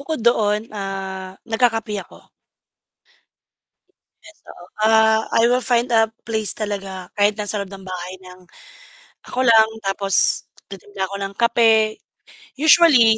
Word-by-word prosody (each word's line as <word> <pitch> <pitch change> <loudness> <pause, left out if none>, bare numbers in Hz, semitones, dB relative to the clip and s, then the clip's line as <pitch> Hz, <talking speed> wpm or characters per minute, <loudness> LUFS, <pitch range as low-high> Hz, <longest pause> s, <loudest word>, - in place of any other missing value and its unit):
bukod 310 +1 -5
doon, 215 -2 +1
ah, 190 -1 -7
nagkakape 225 -1 -1
ako. - - -19 2.0
Yes, 325 - -17
oo. 175 - -13 0.2
Ah, 220 0 +3
I 230 - +3
will 250 +1 +2
find 240 0 0
a 225 -1 +4 0.2
place 220 -2 -2
talaga, 195 -3 -6
kahit 205 0 +2
nasa 210 -1 -2
loob 200 -1 -7
ng 195 -1 -11
bahay 180 0 -7
nang, 185 0 -15 0.8
ako 255 +1 -2
lang 225 -2 +5 0.2
tapos 195 0 +4 0.3
titimpla 195 0 -7
ako 200 - -6
ng 195 0 -7
kape. 225 -2 +2 0.6
Usually 290 -8 +5
215 Hz, 130 wpm, -20 LUFS, 195-230 Hz, 2.0 s, lang